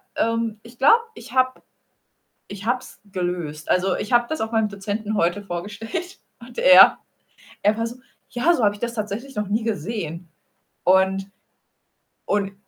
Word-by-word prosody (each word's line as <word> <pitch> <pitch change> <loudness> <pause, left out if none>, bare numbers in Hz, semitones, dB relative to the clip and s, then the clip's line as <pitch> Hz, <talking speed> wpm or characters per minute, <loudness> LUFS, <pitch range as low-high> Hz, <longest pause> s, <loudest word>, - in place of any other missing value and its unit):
ähm, 230 -1 -1
ich 235 +1 -15
glaube, 445 - +6 0.2
ich 235 - -12
habe 255 0 +1 0.9
ich 200 +1 -8
habe 245 +2 +2
es - - -15
gelöst. 175 -5 -3
Also, 185 0 +2
ich 210 - -5
habe 240 0 +4
das 315 - -3
auch 220 +1 -2
meinem 220 -1 +2
Dozenten 205 +2 -4
heute 175 +2 +1
vorgestellt, 210 - -6 0.2
und - - -13
er - - +8 0.7
er 210 +2 +3
war 230 0 -1
so: 240 - -8 0.3
„Ja, 305 +8 +2
so 250 - 0
habe 205 -1 +3
ich - - -14
das 235 0 -2
tatsächlich 230 +5 -5
noch 210 -1 -2
nie 215 +3 0
gesehen.“ 180 -5 -4 0.5
Und 190 +1 +2 0.9
und 200 -1 0
210 Hz, 160 wpm, -23 LUFS, 195-235 Hz, 0.9 s, er